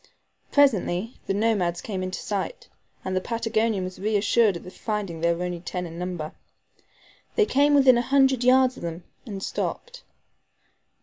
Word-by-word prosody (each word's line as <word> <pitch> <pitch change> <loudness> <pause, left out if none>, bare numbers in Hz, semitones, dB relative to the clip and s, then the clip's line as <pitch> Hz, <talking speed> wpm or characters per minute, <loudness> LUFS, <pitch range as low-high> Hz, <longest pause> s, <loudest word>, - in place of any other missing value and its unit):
Presently 225 -6 +2
the - - +1
nomads 200 -6 +1
came 195 -4 -4
in 185 0 -3
sight, 205 - -4 0.4
and 185 0 -2
the 185 - +1
Patagonian 225 -2 0
was 185 0 -7
reassured 210 0 +2
at 180 +2 -11
finding 205 -7 -4
they 170 0 +3
were 170 +1 -2
only 175 -1 -4
ten 180 +1 -4
in 165 0 -8
number. 175 -4 -4 1.0
They 430 - +4
came 290 -5 +3
within 260 -3 +6
a - - +2
hundred 265 0 +3
yards 255 0 +4
of - - -10
them, 170 +1 -5 0.2
and 195 -3 -6
stopped. - - -4
205 Hz, 160 wpm, -25 LUFS, 180-250 Hz, 1.0 s, within